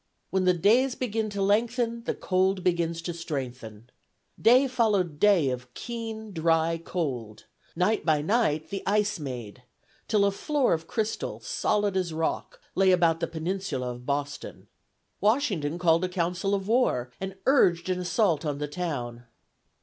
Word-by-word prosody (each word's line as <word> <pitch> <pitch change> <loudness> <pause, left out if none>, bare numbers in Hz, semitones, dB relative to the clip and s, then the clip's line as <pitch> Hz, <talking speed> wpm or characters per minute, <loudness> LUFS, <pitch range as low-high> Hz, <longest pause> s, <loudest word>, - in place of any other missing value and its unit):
"When 190 -1 +1
the 180 -1 +4
days 240 +9 +3
begin 225 -3 -2
to 200 -1 -2
lengthen, 230 +3 +1
the - - -1
cold 185 0 +1
begins 170 -2 0
to 175 - -3
strengthen." 125 -8 -6 0.5
Day 255 +4 +6
followed 205 - +1
day 190 -10 +4
of 125 0 -6
keen, 225 -2 -6
dry 165 -1 +1
cold; 125 -12 -4 0.3
night 190 +5 +1
by 155 -3 +2
night 165 -6 +1
the 195 - -3
ice 205 -1 +1
"made," 125 -5 -7 0.5
till 205 -2 +3
a 200 - +3
floor 285 +6 +1
of 165 0 -3
crystal, 220 -1 -2
solid 210 - 0
as 180 -3 -1
rock, 160 0 -2
lay 190 0 +3
about 170 -3 +3
the 165 - -1
peninsula 160 -6 -3
of 125 0 -10
Boston. 145 0 -4 0.5
Washington 205 - +1
called 170 -1 +3
a 185 - 0
council 180 +2 -1
of 195 -1 -4
war 215 - +1
and 190 0 -4
urged 185 -11 +4
an 185 -1 0
assault 175 -3 +1
on 145 -3 -2
the 150 0 -3
town. 130 -8 -4
180 Hz, 155 wpm, -27 LUFS, 155-210 Hz, 0.5 s, Day